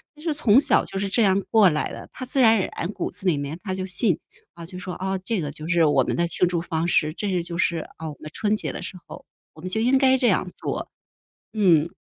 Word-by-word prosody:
就 300 - -16
是 320 - 0
从 235 -4 +5
小 285 - +3
就 - - -6
是 200 +1 -1
这 230 - +2
样 195 -2 +4
过 215 -4 +6
来 150 -2 -2
的， - - -9
他 255 - -7
自 265 +1 +1
然 225 -2 +6
而 190 - -1
然 170 - -3
骨 - - -4
子 195 - -6
里 160 -5 +3
面 145 +3 -4
他 190 -3 -3
就 185 0 -3
信， 190 -1 +1 0.4
啊， 170 -1 -10
就 180 +2 -9
说， 180 0 -6
啊， 190 +1 -2
这 195 +1 -2
个 145 -2 -4
就 155 +2 -8
是 170 -1 +3
我 150 - +3
们 - - -2
的 170 - +1
庆 175 +2 +2
祝 175 -1 -1
方 170 -1 -2
式， 155 -3 +1
这 205 +4 -3
是 180 -3 0
就 170 0 -6
是 170 -1 +1 0.2
啊 160 0 -6
我 150 - -8
们 155 - -8
春 210 0 0
节 - - -3
的 - - -7
时 190 - -6
候， - - -11 0.3
我 - - -16
们 185 - -5
就 220 +4 0
应 255 +4 +4
该 265 -1 +4
这 250 - +2
样 185 -3 +2
做， - - -4 0.6
嗯。 175 -7 +3
185 Hz, 295 characters per minute, -24 LUFS, 170-215 Hz, 0.6 s, 过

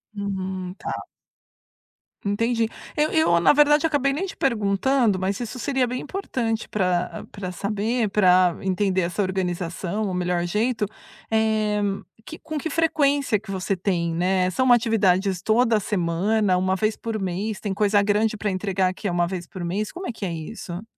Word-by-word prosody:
Uhum, 190 -2 -4
tá. - - -5 1.2
Entendi. 230 +3 +1 0.3
Eu 300 0 +1
eu, 245 - +4
na 170 - +6
verdade, 295 +1 +5
acabei 285 -3 +2
nem 330 +8 -2
te 385 - -7
perguntando, 225 -1 +2
mas 190 +1 -1
isso 240 +2 -5
seria 265 0 +1
bem 250 +1 -3
importante 240 - -3
para 180 -3 -1
para 190 -3 -5
saber, 210 +4 -1
para 185 -3 +4
entender 190 0 +1
essa 175 +4 -1
organização, 185 +1 -2
o - - -3
melhor 180 -1 0
jeito, 215 +4 0 0.4
eh, 215 -1 +1 0.4
que 320 - -8
com 310 - -5
que 310 +3 -3
frequência 285 -6 +2
que 210 -1 -9
você 190 +1 -1
tem? 175 -3 -1
Né, 185 +1 +2
são 255 +6 +2
atividades 200 -6 +3
toda 225 +1 +3
semana? 190 +2 +1
Uma 185 +1 +1
vez 215 +2 0
por 225 -1 -4
mês? 195 +3 -3
Tem 200 -3 -3
coisa 205 0 +3
grande 210 +2 +1
para 205 0 -1
entregar 185 -1 0
que 205 - -5
é 180 - 0
uma 175 0 +1
vez 180 -1 -5
por 185 0 -7
mês? 200 +5 -2
Como 365 +1 -6
é - - -2
que 215 - -5
é 175 - -2
isso? 175 +2 -6
205 Hz, 170 wpm, -24 LUFS, 185-230 Hz, 1.2 s, na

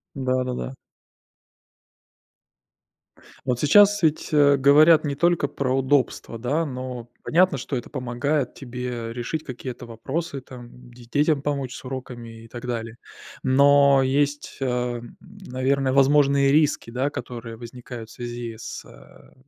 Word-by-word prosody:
Да-да-да. 130 0 -2 2.7
Вот 125 -2 0
сейчас 205 +7 +5
ведь, 155 -1 +1
э, 145 -2 +5
говорят 150 +4 +6
не 140 -1 -2
только 170 -1 +2
про 130 -2 -1
удобства, 130 -3 0
да, 145 +7 0
но 125 -3 -6
понятно, 175 -2 +3
что 135 +2 -4
это 120 - -5
помогает 130 +2 -2
тебе 125 -3 -6
решить 125 +6 -4
какие-то 125 -1 -7
вопросы, 135 +6 -4
там, 125 -1 -13
де 120 0 -15
детям 145 +3 +1
помочь 140 -3 -2
с - - -10
уроками 120 -3 -8
и - - -13
так 120 +1 -9
далее. 115 -1 -4 0.5
Но 140 +1 +5
есть, 145 +2 -1
э, 125 -2 -1 0.2
наверно, 135 -8 -2
возможные 140 0 +4
риски, 150 -5 +2
да, 130 +4 -1
которые 115 -4 -7
возникают 120 -1 -9
в - - -13
связи 120 -2 -6
с, 115 - -8
э, - - -17
130 Hz, 130 wpm, -24 LUFS, 120-145 Hz, 2.7 s, говорят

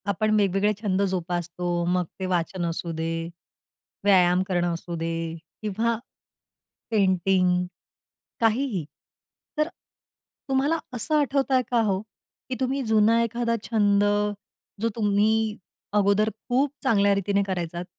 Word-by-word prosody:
आपण 215 +2 +1
वेगवेगळे 200 +1 +2
छंद 200 -3 0
जोपासतो 175 -1 -3 0.2
मग 180 0 +1
ते 190 - -2
वाचन 180 0 -1
असू 170 0 -3
दे, 165 +1 -3 0.7
व्यायाम 180 -2 +5
करणं 175 -2 0
असू 170 +1 -5
दे 165 +1 -2 0.5
किंवा 220 +2 0 0.9
पेंटिंग 185 -3 +2 0.8
काहीही. 225 - +1 0.7
तर 305 0 +2 0.8
तुम्हाला 275 +5 +2 0.2
असं 250 +6 -1
आठवतंय 270 -2 +2
का 240 -1 +4
हो, 195 -2 +1 0.5
की 255 - -2
तुम्ही 265 +1 0
जुना 220 +1 +4
एखादा 230 0 0
छंद 205 -3 +2 0.8
जो 230 - +2
तुम्ही 210 -1 +2 0.6
अगोदर 205 +1 +3 0.2
खूप 265 +3 +2
चांगल्या 205 -6 +3
रीतीने 200 +1 +1
करायचात, 175 -2 -3
200 Hz, 115 wpm, -25 LUFS, 180-230 Hz, 0.9 s, व्यायाम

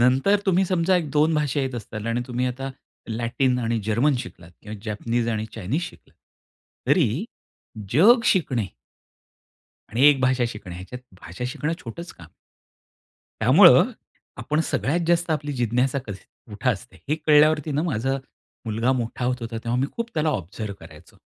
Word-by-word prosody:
नंतर 135 +12 +4
तुम्ही 190 0 +3
समजा 185 0 +2
1-2 155 -1 +1
भाषा 150 -2 0
येत 130 -1 -2
असताल 110 -1 -6
आणि 115 +1 0
तुम्ही 125 0 -1
आता 135 +2 -4 0.4
लॅटिन 120 +3 0
आणि 115 -1 0
जर्मन 115 +7 +2
शिकलात 85 -7 -9
किंवा 105 +1 -7
जॅपनीज 115 +2 -1
आणि 110 -1 -2
चाइन्स 115 - -2
शिकलात 180 - -10 0.7
तरी 145 - +2 0.7
जग 215 - +6
शिकणे. 130 - +1 1.2
आणि 120 +5 +1
एक 145 -2 +5
भाषा 130 -1 +2
शिकणं. 105 -5 -8
ह्याच्यात 95 +8 -8 0.2
भाषा 90 +8 -8
शिकणं 150 +5 -2
छोटच 170 +9 -8
काम. 80 - -14 1.1
त्यामुळं - - +7 0.5
आपण 150 +1 -1
सगळ्यात 160 +6 0
जास्त 175 0 +2
आपली 150 -1 -2
जिज्ञासा 125 +2 0
कशी 100 -2 -7 0.3
कुठं 110 +5 0
असते, 120 +5 -12
हे 150 - +2
कळल्यावरती 155 0 +3
ना 145 +1 0
माझं 135 -4 -1 0.5
मुलगा 115 +3 0
मोठा 120 -1 -2
होत 125 0 +1
होता 115 0 -5
तेव्हा 120 +1 0
मी 135 - +1
खूप 235 0 -3
त्याला 155 0 +1
ऑब्झर्व्ह 100 - -4
करायचो - - -15
125 Hz, 150 wpm, -24 LUFS, 115-150 Hz, 1.2 s, त्यामुळं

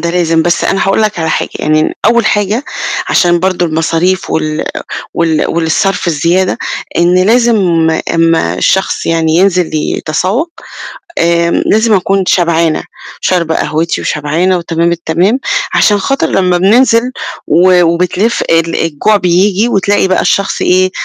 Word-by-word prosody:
ده 170 - -2
لازم، 165 -2 +1
بس 175 0 0
أنا 195 - 0
هاقول 195 +3 +1
لك 210 -4 -1
على 160 -1 -1
حاجة، - - -1
يعني 155 0 0
أول 230 0 +3
حاجة 210 +6 0 0.4
عشان 175 -1 +2
برضو 185 -1 0
المصاريف 165 +3 -1
وال 155 0 -2 0.5
وال 165 -2 0
والصرف 170 +4 -1
الزيادة، 170 +4 0 0.4
إن 175 +1 +3
لازم 235 +2 +3 0.6
أمّا 165 - +1
الشخص 190 - 0
يعني 165 -1 0
ينزل 180 -3 +1
يتسوّق، 185 - -2 0.7
آآ 170 0 +1
لازم 220 +5 +1
أكون 195 0 0
شبعانة، 165 -3 +1 0.4
شاربة 170 -3 0
قهوتي، 160 +2 -1
وشبعانة، 160 +5 -1
وتمام 170 0 -1
التمام. 170 +7 0 0.4
عشان 205 -1 +3
خاطر 275 +7 -1
لمّا 180 -2 +1
بننزل 230 +5 +3 0.3
و 180 +1 +4
وبتلِف 180 +6 0
ال 165 0 +1
الجوع 165 +7 +1
بيبجي، 190 +4 +1
وتلاقي 200 -2 +1
بقى 185 - +1
الشخص 200 -1 0
إيه، 185 +1 +2
180 Hz, 135 wpm, -11 LUFS, 165-195 Hz, 0.7 s, و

